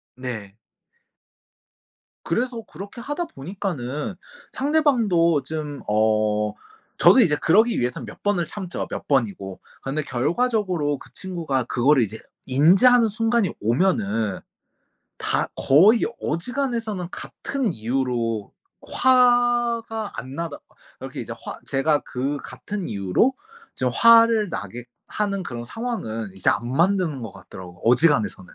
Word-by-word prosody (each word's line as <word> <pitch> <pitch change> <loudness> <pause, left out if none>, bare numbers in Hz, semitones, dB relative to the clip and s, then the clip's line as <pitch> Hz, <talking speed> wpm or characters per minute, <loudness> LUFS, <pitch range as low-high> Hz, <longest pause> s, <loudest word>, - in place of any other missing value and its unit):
네. 110 -6 -6 1.7
그래서 245 -1 -1
그렇게 205 +4 -10
하다 295 +8 -3
보니까는 150 - -5 0.4
상대방도 230 - +2
좀 150 -3 -5
어. 105 0 +1 0.4
저도 - - +6
이제 175 -11 +5
그러기 220 +10 +3
위해선 125 0 -2
몇 110 - -12
번을 205 -4 +1
참죠. 185 +1 -5
몇 - - -6
번이고. 100 -8 -1 0.2
근데 145 +3 -2
결과적으로 170 - 0
그 - - -15
친구가 165 -8 -2
그거를 130 +3 +3
이제 110 +1 -5 0.3
인지하는 195 - +5
순간이 225 -2 +1
오면은 110 - +1 0.8
다 - - 0
거의 195 - +5 0.2
어지간해서는 225 - -2
같은 260 -2 -3
이유로 115 -2 -2 0.4
화가 240 -3 +2
안 130 +4 -7
나다 165 -2 -4
거 - - -30 0.2
이렇게 - - -6
이제 - - -6
화 - - -6
제가 145 +2 +2
그 135 +3 -2
같은 205 -3 -6
이유로 100 - +1 0.4
지금 - - -1
화를 230 -2 +6
나게 120 - -6 0.2
하는 200 -2 -2
그런 120 -8 -6
상황은 120 - -4
이제 95 - -1
안 120 - +1
만드는 170 +2 +1
거 115 -3 -7
같더라고. 90 -1 -12
어지간해서는. 115 - +2
160 Hz, 270 characters per minute, -23 LUFS, -, 1.7 s, 저도